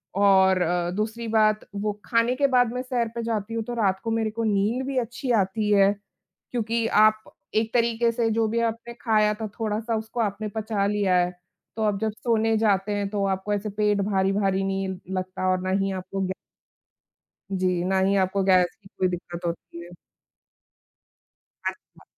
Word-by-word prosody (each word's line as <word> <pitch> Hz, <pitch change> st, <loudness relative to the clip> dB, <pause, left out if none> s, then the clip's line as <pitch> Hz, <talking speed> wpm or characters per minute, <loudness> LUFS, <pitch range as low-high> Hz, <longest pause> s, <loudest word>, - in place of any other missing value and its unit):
और 190 Hz, -2 st, +5 dB
अ, 175 Hz, 0 st, 0 dB
दूसरी 220 Hz, +3 st, -3 dB
बात 215 Hz, -1 st, +2 dB
वो 210 Hz, +1 st, -1 dB
खाने 230 Hz, +1 st, +2 dB
के 280 Hz, +2 st, +3 dB
बाद 245 Hz, -3 st, +3 dB
मैं 250 Hz, -, -2 dB
सैर 250 Hz, -2 st, -1 dB
पे 235 Hz, -, -3 dB
जाती 225 Hz, -1 st, -2 dB
हूँ 225 Hz, -1 st, -1 dB
तो 240 Hz, -, -5 dB
रात 195 Hz, -5 st, +1 dB
को 225 Hz, -, -2 dB
मेरे 225 Hz, -1 st, 0 dB
को 230 Hz, +1 st, -3 dB
नींद 215 Hz, +4 st, +1 dB
भी 275 Hz, -1 st, -2 dB
अच्छी 245 Hz, +2 st, -2 dB
आती 210 Hz, +3 st, -1 dB
है। 200 Hz, -1 st, +5 dB, 0.6 s
क्योंकि 230 Hz, -1 st, -1 dB
आप 215 Hz, 0 st, +4 dB, 0.3 s
एक 220 Hz, +1 st, +1 dB
तरीक़े 235 Hz, -1 st, +2 dB
से 230 Hz, 0 st, 0 dB
जो 225 Hz, 0 st, +1 dB
भी 230 Hz, +2 st, 0 dB
आपने 230 Hz, +1 st, -3 dB
खाया 215 Hz, -2 st, +3 dB
था 220 Hz, 0 st, -4 dB
थोड़ा-सा, 220 Hz, +1 st, -1 dB
उसको 220 Hz, +2 st, -5 dB
आपने 215 Hz, 0 st, -2 dB
पचा 215 Hz, -2 st, -1 dB
लिया 200 Hz, -3 st, +1 dB
है। 180 Hz, 0 st, +2 dB, 0.4 s
तो 220 Hz, -, -2 dB
आप 205 Hz, -2 st, +1 dB
जब 220 Hz, 0 st, 0 dB
सोने 225 Hz, 0 st, +1 dB
जाते 205 Hz, -2 st, +2 dB
हैं 200 Hz, -1 st, -1 dB
तो 200 Hz, -1 st, -1 dB
आपको 190 Hz, +2 st, -1 dB
ऐसे 205 Hz, +1 st, -2 dB
पेट 205 Hz, 0 st, +1 dB
भारी-भारी 195 Hz, 0 st, +1 dB
नहीं 195 Hz, 0 st, -1 dB, 0.3 s
लगता 185 Hz, 0 st, -2 dB
और 185 Hz, 0 st, 0 dB
ना 185 Hz, -, -3 dB
ही 195 Hz, -, -1 dB
आपको 195 Hz, +1 st, -5 dB
गै 185 Hz, -, -2 dB, 1.2 s
जी। 185 Hz, -2 st, 0 dB
ना 190 Hz, +1 st, +2 dB
ही 195 Hz, +1 st, +2 dB
आपको 190 Hz, +1 st, 0 dB
गैस 185 Hz, -2 st, +3 dB
की 195 Hz, -, -16 dB
कोई 185 Hz, -, +2 dB
दिक़्क़त 175 Hz, 0 st, -6 dB
होती 170 Hz, 0 st, -5 dB
है। 175 Hz, -, -13 dB, 1.8 s
अच्छा। -, -, -15 dB
210 Hz, 185 wpm, -25 LUFS, 195-225 Hz, 1.8 s, और